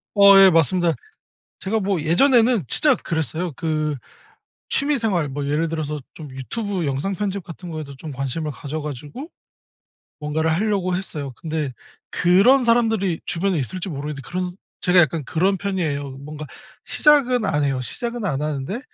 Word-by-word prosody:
어 200 -1 +8
예 195 -1 +8
맞습니다. 170 0 +2 0.7
제가 220 +3 -1
뭐 195 -4 -1
예전에는 230 - +3
진짜 290 - +5
그랬어요. 160 +1 -3
그 155 -1 -1 0.7
취미 285 -1 +3
생활 180 -10 0
뭐 140 +1 -4
예를 150 +3 0
들어서 150 -2 -3
좀 155 -3 -9
유튜브 185 - -4
영상 140 +8 -2
편집 200 -1 -3
같은 175 +1 -10
거에도 155 -4 -7
좀 150 +2 -8
관심을 135 +4 -3
가져 145 +3 -6
가지고 150 - -7 0.9
뭔가를 155 +2 0
하려고 190 0 0
했어요. 150 -8 -4
근데 155 -4 -3 0.4
그런 200 +10 +4
사람들이 225 -7 +2
주변에 185 0 0
있을지 180 +8 -4
모르겠는데 145 -3 -5
그런 180 +2 -4 0.3
제가 180 0 +5
약간 160 -3 +1
그런 190 +8 +1
편이에요. 160 -8 -2
뭔가 150 +2 -8 0.4
시작은 255 -6 +3
안 150 -3 +1
해요. 135 -2 0
시작은 235 - -4
안 145 -8 -1
하는데 150 - -3
165 Hz, 340 characters per minute, -22 LUFS, 150-200 Hz, 0.9 s, 어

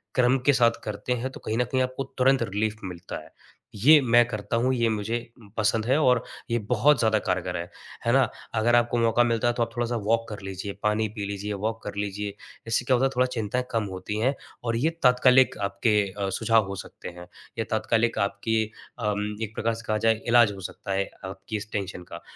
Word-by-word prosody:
क्रम 125 +1 +4
के 145 - +6
साथ 120 -3 +5
करते 110 +3 -3
हैं 125 +2 -3
तो - - -10
कहीं 110 - -1
न 125 - +3
कहीं 130 +2 0
आपको 130 +1 -2
तुरंत 135 +1 +4
रिलीफ़ 105 +2 -1
मिलता 90 -1 -6
है। 80 - -17 0.4
ये 145 +10 +7
मैं 120 -1 +5
करता 110 -2 -3
हूँ, 125 +3 +2
ये 115 -2 +2
मुझे 110 +2 -1 0.4
पसंद 110 +1 +1
है 130 +4 +3
और 125 -5 +3 0.3
ये 120 - +2
बहुत 125 +4 +4
ज़्यादा 110 -2 +3
कारगर 90 -2 -2
है। 85 +1 -5 0.4
है - - +3
ना? - - +4 0.3
अगर 115 +2 +3
आपको 120 0 +2
मौका 115 +1 +3
मिलता 115 -1 +1
है 120 - +2
तो 120 - +3
आप 115 - -3
थोड़ा-सा 120 0 -1
वॉक 115 +2 +1
कर 105 -2 -7
लीजिए, 95 +1 -5
पानी 105 +1 +2
पी 105 -2 -3
लीजिए, 100 +1 -4
वॉक 110 +3 -3
कर 105 - -6
लीजिए। 100 0 -3 0.3
इससे 115 +1 0
क्या 130 - +4
होता 130 +2 +2
है - - +3
थोड़ा 125 +1 +4
चिंताएँ 125 0 -2
कम 115 -2 0
होती 95 +3 -4
हैं 130 +5 +1 0.3
और 115 -1 -1
ये 145 +7 +2
तात्कालिक 125 0 +5
आपके 100 +2 +2 0.2
अ, 100 -1 0
सुझाव 110 +1 +2
हो 100 - -4
सकते - - -10
हैं, 90 0 -11 0.3
या 115 - 0
तात्कालिक 115 +1 +1
आपकी 110 +2 -1 0.4
अम 105 -1 -1
एक 110 0 -6
प्रकार 115 +1 0
से 115 - -9
कहा 110 - +1
जाए, 110 +1 +2
इलाज 120 -2 +6
हो 100 - -9
सकता 100 - -8
है 100 0 -1 0.2
आपकी 95 +3 -5
इस 105 +1 -8
टेंशन 95 -3 -4
का। 85 - -7
110 Hz, 220 wpm, -26 LUFS, 105-120 Hz, 0.4 s, ये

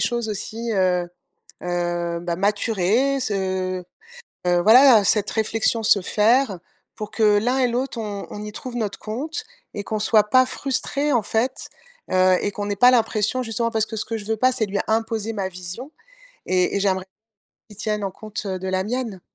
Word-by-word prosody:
choses 235 -2 0
aussi, 225 +3 -4
heu 180 -3 +1 0.6
heu, 175 -1 -2
bah, 175 -1 -2
maturer, 210 +6 +1
se 185 -4 -2 0.6
heu, 175 0 +3
voilà, 235 +1 +7
cette 205 0 +2
réflexion 225 +1 0
se 210 -1 +4
faire 220 +1 +2 0.4
pour 210 -1 -6
que 215 -2 +3
l'un 245 +5 +1
et 255 - +4
l'autre 250 +2 -2
on 205 -2 -5
on 210 - -7
y 210 0 -7
trouve 245 +3 -7
notre 215 -4 -3
compte 295 - -5 0.3
et 205 - -4
qu'on 215 0 -2
soit 215 0 +4
pas 255 +2 +6
frustrés, 280 +2 -2
en 240 - +3
fait, 230 +5 -2 0.4
heu, 185 0 +4
et 205 - -2
qu'on 205 - -4
n'ait 205 0 -2
pas 250 +5 +7
l'impression, 225 0 +1
justement 230 0 -2
parce 220 -1 +1
que 220 - -7
ce 215 - -3
que 225 - -3
je 210 - -7
veux 220 +1 -2
pas, 255 +3 +4
c'est 250 -3 0
lui 200 -1 -2
imposer 225 0 -1
ma 195 -2 -2
vision 185 - -8 0.5
et 180 0 +1
et - - +1
j'aimerais 190 -2 0 0.6
qu'il 210 - -14
tienne 210 -1 -2
en 195 - -2
compte, 215 +2 -7
heu, 190 -1 -2
de 190 - -4
la 185 0 0
mienne. 225 -3 -3
215 Hz, 190 wpm, -22 LUFS, 190-235 Hz, 0.6 s, voilà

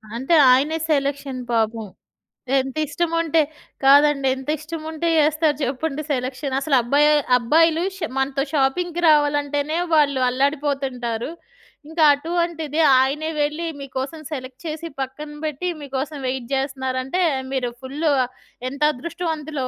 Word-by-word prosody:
అంటే 265 +8 +1 0.2
ఆయనే 290 +5 +3
సెలక్షన్ 280 -2 -1
పాపం. 225 -1 0 0.7
ఎంత 265 +1 -4
ఇష్టముంటే 330 0 +1 0.4
కాదండి 280 0 +5
ఎంత 265 +2 -8
ఇష్టముంటే 320 +1 -5
జేస్తారు 305 0 +2
చెప్పండి 275 +3 -2
సెలక్షన్. 260 +1 -2
అసలు 275 -1 +1
అబ్బాయి 285 +5 +3 0.3
అబ్బాయిలు 320 +7 +3
ష్ - - -13 0.2
మనతో 270 0 0
షాపింగ్‌కి 335 +5 0
రావాలంటేనే 290 +1 +2 0.2
వాళ్ళు 285 -3 +3
అల్లాడిపోతుంటారు. 270 -3 -1 0.6
ఇంకా 320 -1 +1
అటువంటిది 325 -1 -2 0.2
ఆయనే 295 +4 0
వెళ్లి 305 +3 -1
మీకోసం 275 +3 -5
సెలెక్ట్ 260 +1 -8
చేసి 315 +2 -5
పక్కన 295 +3 -6
బెట్టి 310 +4 -2
మీకోసం 280 +1 -4
వెయిట్ 255 -2 -3
జేస్తున్నారంటే 265 +3 -1 0.3
మీరు 250 -2 -1
ఫుల్ 275 +4 -7 0.7
ఎంత 280 +2 -10
అదృష్టవంతులో. 310 -2 -4
285 Hz, 115 wpm, -22 LUFS, 265-315 Hz, 0.7 s, కాదండి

